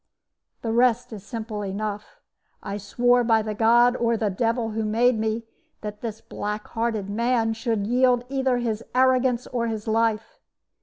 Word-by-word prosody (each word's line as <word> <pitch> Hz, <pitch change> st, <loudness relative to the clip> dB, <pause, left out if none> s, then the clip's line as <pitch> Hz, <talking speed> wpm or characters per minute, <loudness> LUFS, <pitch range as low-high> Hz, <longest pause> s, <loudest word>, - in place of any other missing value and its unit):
"The 225 Hz, -, -1 dB
rest 240 Hz, 0 st, +2 dB
is 205 Hz, -3 st, -8 dB
simple 220 Hz, -1 st, -5 dB
enough. 210 Hz, -, -5 dB, 0.4 s
I 200 Hz, -, -4 dB
swore 245 Hz, +4 st, +2 dB
by 225 Hz, -2 st, +3 dB
the 215 Hz, 0 st, -3 dB
God, 235 Hz, +3 st, +4 dB
or 235 Hz, -2 st, +1 dB
the 210 Hz, -2 st, 0 dB
Devil, 230 Hz, +3 st, 0 dB
who 220 Hz, +1 st, -2 dB
made 225 Hz, +2 st, +2 dB
me, 220 Hz, +1 st, -1 dB, 0.4 s
that 210 Hz, -1 st, -7 dB
this 220 Hz, -2 st, -5 dB
black 210 Hz, +1 st, -5 dB
hearted 225 Hz, -3 st, -2 dB
man 230 Hz, +2 st, +1 dB
should 225 Hz, -2 st, -1 dB
yield 245 Hz, +1 st, +3 dB
either 265 Hz, -1 st, 0 dB
his 230 Hz, -2 st, -2 dB
arrogance 255 Hz, -1 st, +3 dB
or 235 Hz, -2 st, -2 dB
his 220 Hz, -1 st, -4 dB
life. 225 Hz, -, 0 dB
225 Hz, 160 wpm, -24 LUFS, 215-245 Hz, 0.4 s, God